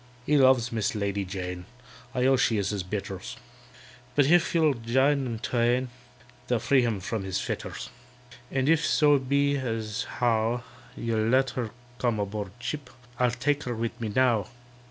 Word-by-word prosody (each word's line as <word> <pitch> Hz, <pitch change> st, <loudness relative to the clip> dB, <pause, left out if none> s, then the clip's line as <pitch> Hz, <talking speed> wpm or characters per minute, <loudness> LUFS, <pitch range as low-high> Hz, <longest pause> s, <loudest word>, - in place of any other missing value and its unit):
"He 150 Hz, -, +2 dB
loves 130 Hz, -3 st, +5 dB
MISS 110 Hz, -1 st, -1 dB
LADY 100 Hz, -1 st, -1 dB
JANE 90 Hz, -1 st, -5 dB, 0.5 s
(I 125 Hz, 0 st, +2 dB
own 135 Hz, 0 st, +5 dB
she 115 Hz, -3 st, +2 dB
is 100 Hz, 0 st, 0 dB
his 100 Hz, -2 st, -2 dB
betters), 95 Hz, 0 st, -5 dB, 0.8 s
But 145 Hz, -, +5 dB
if 175 Hz, +3 st, +3 dB
you'll 160 Hz, -3 st, +4 dB
jine 130 Hz, +4 st, +2 dB
them 115 Hz, -2 st, -3 dB
twain, 120 Hz, +2 st, +1 dB, 0.6 s
They'll 125 Hz, -, +2 dB
free 130 Hz, +4 st, +3 dB
him 115 Hz, -4 st, 0 dB
from 110 Hz, +2 st, -3 dB
his 95 Hz, 0 st, -2 dB
fetters. -, -, -5 dB, 0.6 s
"And 135 Hz, 0 st, 0 dB
if 160 Hz, 0 st, +4 dB
so 145 Hz, -2 st, +4 dB
be 140 Hz, +2 st, +1 dB
as 115 Hz, -5 st, -3 dB
how 120 Hz, 0 st, +1 dB, 0.3 s
You'll 110 Hz, -2 st, 0 dB
let 130 Hz, +2 st, +3 dB
her 120 Hz, -4 st, -3 dB, 0.3 s
come 120 Hz, -4 st, +1 dB
aboard 100 Hz, 0 st, -3 dB
ship, 125 Hz, +3 st, -5 dB, 0.3 s
I'll 125 Hz, -1 st, +4 dB
take 135 Hz, +4 st, 0 dB
her 120 Hz, -1 st, -2 dB
with 115 Hz, +1 st, -4 dB
me 110 Hz, -, -2 dB
now." 125 Hz, -5 st, +3 dB
120 Hz, 165 wpm, -27 LUFS, 110-135 Hz, 0.8 s, loves